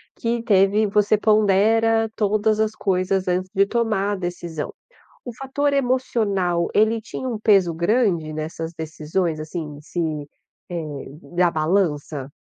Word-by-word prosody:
que 235 0 -1
teve, 205 +1 +3
você 210 +1 +3
pondera 220 +2 +3
todas 215 +1 +1
as 220 0 +2
coisas 185 0 0
antes 185 +1 0
de 195 +1 +4
tomar 215 -3 0
a - - -1
decisão. 175 -4 -5 0.5
O 245 - -6
fator 280 +2 -1
emocional 215 -10 0
ele 220 +1 +3
tinha 260 +3 -6
um 230 -4 -3
peso 195 -6 +4
grande 170 -3 +1
nessas 160 +1 -5
decisões 160 +1 -2
assim 155 -1 -6
se, 170 +3 -6 0.7
eh, 170 -2 -3 0.5
na 175 0 +4
balança? 155 -4 -1
195 Hz, 130 wpm, -22 LUFS, 170-220 Hz, 0.7 s, de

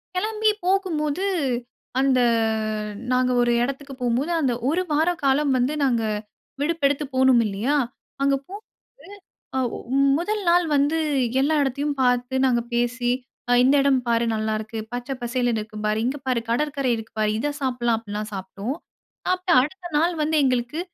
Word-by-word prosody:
கிளம்பி 430 +3 +1 0.2
போகும்போது 365 -3 0 0.7
அந்த 270 -1 +3 0.9
நாங்க 255 0 +2
ஒரு 240 0 +2
இடத்துக்கு 275 +2 -4
போம்போது, 250 +7 0
அந்த 260 -4 +1 0.2
1 335 +5 +1
வார 310 +3 +3
காலம் 275 +1 +3
வந்து 255 +4 +1
நாங்க 240 -4 +2 0.6
விடுப்பெடுத்து 290 -2 +1
போணும் 260 -2 +5
இல்லயா! 215 +8 0 0.5
அங்க 275 0 +3
போம்போது 405 +4 -10 0.9
அவ் 250 -3 -1 0.4
முதல் 420 +5 -1
நாள் 350 +1 +5
வந்து 285 +3 +2 0.4
எல்லா 290 +4 +2
இடத்தையும் 285 +2 -1
பார்த்து 250 0 +1
நாங்க 245 -2 +3
பேசி 240 +1 0 0.4
ஆ - - +4
இந்த 270 +2 +5
இடம் 275 -2 +3
பாரு! 235 0 +2
நல்லா 215 0 -1
இருக்கு. 220 +1 -6
பச்சை 245 +2 -4
பசேல்ன்னு 240 -2 0
இருக்கு 215 0 -9
பாரு! 215 0 +1
இங்க 265 +3 -1
பாரு! 250 -2 +1
கடற்கரை 275 +1 0
இருக்கு 225 0 -9
பாரு. 215 -1 +2
இத 290 +5 -1
சாப்பிட்லாம் 245 -3 0
அப்பிடிலாம் 210 -1 -5
சாப்பிட்டோம். 195 +7 -5 0.6
அப்பறம் 365 -5 +3
அடுத்த 355 +6 -6
நாள் 340 +3 +2
வந்து 315 +1 +1
எங்களுக்கு 255 +4 0
265 Hz, 145 wpm, -23 LUFS, 240-300 Hz, 0.9 s, போணும்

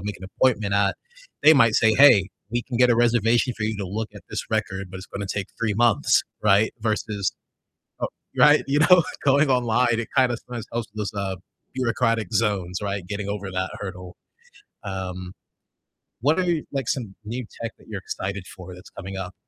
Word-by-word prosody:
make 105 0 -4
an 95 - -10
appointment 105 0 +1
at, 100 0 +2 0.5
they 155 - +9
might 115 -5 +5
say, 110 -1 +4
"Hey, 120 -9 +7 0.2
we 120 +1 -1
can 125 - -5
get 125 +1 +5
a - - +5
reservation 120 +1 +3
for 110 - -5
you 110 0 -2
to 100 - -4
look 105 +4 -3
at 100 - -11
this 110 - -3
record, 100 -4 -2
but 95 - -7
it's 95 - -10
gonna 100 0 -5
take 100 -2 -3
3 110 -3 0
months," 120 -1 +3 0.2
right? 105 +1 +4
Versus 105 -2 -1 0.7
oh - - -1 0.3
Right, - - +6
you 140 +2 +2
know, 175 +2 +6 0.2
going 140 +1 +4
online, 120 -2 +2
it 115 - -4
kind 130 -2 +4
of 120 - -3
sometimes 120 -3 -6
helps 115 -1 -3
with 110 - -8
those, 105 0 -3
uh, 95 -1 -2 0.4
bureaucratic 115 -4 0
zones, 95 -5 0
right? 100 -2 -3
Getting 100 +1 -4
over 100 -1 -4
that 95 0 -2
hurdle. 90 -2 -7 0.7
Um, 95 -2 -5 0.9
what 150 +8 +2
are, - - +1 0.3
like, 135 -3 -2
some 115 -9 -2
new 120 +4 -4 0.2
tech 115 -1 -4
that - - -20
you're 105 -3 -5
excited 95 0 -5
for 90 0 -10
that's 90 0 -14
coming 95 0 -8
up? 95 -1 -5
110 Hz, 195 wpm, -24 LUFS, 95-120 Hz, 0.9 s, they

